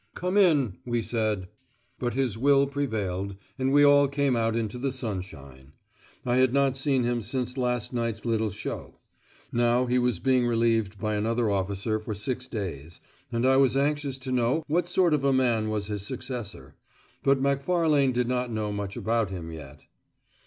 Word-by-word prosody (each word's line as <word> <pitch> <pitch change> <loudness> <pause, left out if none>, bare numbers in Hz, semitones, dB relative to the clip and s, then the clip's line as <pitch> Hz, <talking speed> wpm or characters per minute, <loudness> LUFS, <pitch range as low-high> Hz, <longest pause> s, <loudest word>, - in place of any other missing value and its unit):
"Come 180 +2 -2
in," 150 - +3
we 120 -2 -1
said. 110 -5 -1 0.5
But 120 -1 -2
his 130 -5 0
will 140 +3 +4
prevailed, 105 -9 -3 0.2
and 130 0 +1
we 145 +1 +6
all 145 0 +6
came 140 -2 +1
out 115 -1 +1
into 115 +1 -2
the 135 +1 -1
sunshine. 85 - -7 0.5
I 125 0 +1
had 130 -1 +3
not 140 -1 +3
seen 135 -1 +1
him 120 0 0
since 125 +3 -3
last 125 -2 -1
night's 115 -2 -2
little 110 -2 +1
show. 100 +2 -7 0.5
Now 120 +1 +2
he 125 0 +2
was 125 -4 +1
being 125 +4 +2
relieved 115 -3 +1
by 110 +1 -2
another 110 +1 0
officer 100 +3 -1
for 110 0 -5
six 125 +5 -4
days, 85 - -6 0.3
and 115 +1 0
I 130 0 +5
was 135 -1 +4
anxious 145 -1 0
to 130 0 -6
know 125 +5 +1
what 170 +3 0
sort 175 -2 +3
of 145 -2 +1
a 140 - +3
man 120 -5 +2
was 105 -2 -2
his 105 -1 -4
successor. 125 -2 -6 0.5
But 135 -1 +3
Macfarlane 140 +1 +2
did 125 -1 0
not 125 -1 -1
know 110 -1 -2
much 100 -1 -4
about 115 -2 0
him 85 -4 -6
yet. 75 -3 -11
120 Hz, 175 wpm, -27 LUFS, 105-135 Hz, 0.5 s, we